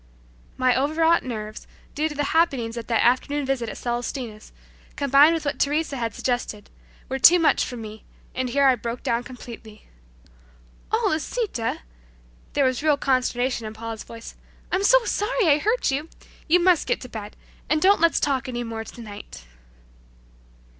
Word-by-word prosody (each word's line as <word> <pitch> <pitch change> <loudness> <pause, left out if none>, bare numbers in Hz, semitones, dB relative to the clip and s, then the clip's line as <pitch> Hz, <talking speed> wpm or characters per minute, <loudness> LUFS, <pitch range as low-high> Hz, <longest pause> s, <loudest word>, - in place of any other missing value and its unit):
My 255 -1 +3
overwrought 320 +5 +3
nerves, 215 -4 -6 0.3
due 310 +2 0
to 295 - -8
the 290 - 0
happenings 270 -9 +1
at 235 -1 -6
that 230 -2 +2
afternoon 280 +4 +1
visit 260 -4 -1
at - - -7
Celestina's, 240 -2 -4 0.4
combined 285 +3 +5
with 320 - -4
what 285 - -2
Teresa 295 +1 0
had 230 -4 -3
suggested, 245 -4 -3 0.4
were 265 +1 -3
too 345 +7 +8
much 330 -3 +3
for 245 - -5
me, 220 -1 -9 0.3
and 255 -1 -2
here 280 +3 +2
I 265 - +6
broke 235 0 -5
down 235 +1 0
completely. 235 -4 -11 1.1
"Oh, 440 -1 +2
Lisita!" 315 - -2 0.7
there 280 - +2
was 255 0 0
real 300 -2 +3
consternation 255 -3 0
in 215 - -8
Paula's 225 0 -6
voice, 230 0 -10 0.4
"I'm 380 - +1
so - - +5
sorry 415 0 0
I 295 -1 +5
hurt 440 - +1
you! 295 +4 -3 0.4
You 350 +2 +4
must 360 -2 +3
get - - 0
to 250 - -7
bed, 215 -3 -8 0.3
and 310 - +3
don't 385 +1 +4
let's 335 0 +4
talk 270 -2 0
any 240 -1 -3
more 225 -1 -5
tonight." 210 - -10
260 Hz, 165 wpm, -24 LUFS, 235-310 Hz, 1.1 s, too